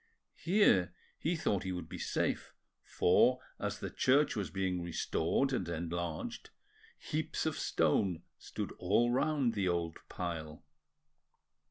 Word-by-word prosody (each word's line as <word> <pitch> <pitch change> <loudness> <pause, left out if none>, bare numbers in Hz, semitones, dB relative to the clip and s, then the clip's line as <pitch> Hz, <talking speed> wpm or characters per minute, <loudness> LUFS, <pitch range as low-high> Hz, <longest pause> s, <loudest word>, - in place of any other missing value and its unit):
Here 130 - +3 0.2
he 170 +3 0
thought 100 - 0
he 95 - -3
would 90 -3 -4
be 90 +1 -7
safe, - - -1 0.3
for, 125 +8 +4 0.2
as - - -2
the - - -5
church 140 +4 +3
was 105 -3 -2
being 95 -2 -1
restored 85 +8 0
and 95 -9 -1
enlarged, 85 -1 -4 0.5
heaps - - -2
of - - 0
stone 90 -4 +1 0.2
stood - - -5
all 115 +7 +3
round 135 -2 +2
the 100 -4 0
old 85 -2 -1
pile. 80 -3 -5
90 Hz, 130 wpm, -33 LUFS, 85-125 Hz, 0.5 s, for